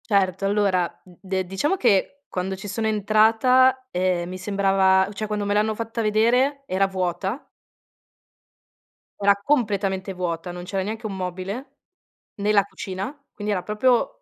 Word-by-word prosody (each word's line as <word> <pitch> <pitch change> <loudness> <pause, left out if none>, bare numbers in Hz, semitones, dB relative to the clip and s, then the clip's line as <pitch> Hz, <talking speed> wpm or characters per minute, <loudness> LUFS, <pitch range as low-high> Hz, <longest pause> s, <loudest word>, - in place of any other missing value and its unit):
Certo, 195 -2 +2
allora, 195 -3 +2 0.2
d 180 -2 -18
de 190 -1 -2
diciamo 195 - 0
che, 245 - +1
quando 190 +1 -3
ci 195 +2 -8
sono 220 +2 -2
entrata, 225 +5 +3
ehm, 180 -1 0
mi 185 +1 -6
sembrava, 190 -1 +3
o 205 - -8
cioè, 215 +2 -4
quando 210 -1 -2
me 205 - 0
l'hanno 215 +1 +1
fatta 230 +1 -4
vedere, 245 +6 +2
era 195 -3 +1
vuota 190 - -3 1.7
era 200 0 +4
completamente 200 -8 0
vuota, 175 -1 -3
non 175 0 -7
c'era 190 +1 -2
neanche 220 +3 -5
1 205 -2 -3
mobile, 190 +9 -5 0.6
né 205 +1 0
la 205 -2 +5
cucina, 195 +2 -6 0.2
quindi 210 0 -3
era 185 - -1
proprio 250 - +1
200 Hz, 150 wpm, -23 LUFS, 190-220 Hz, 1.7 s, la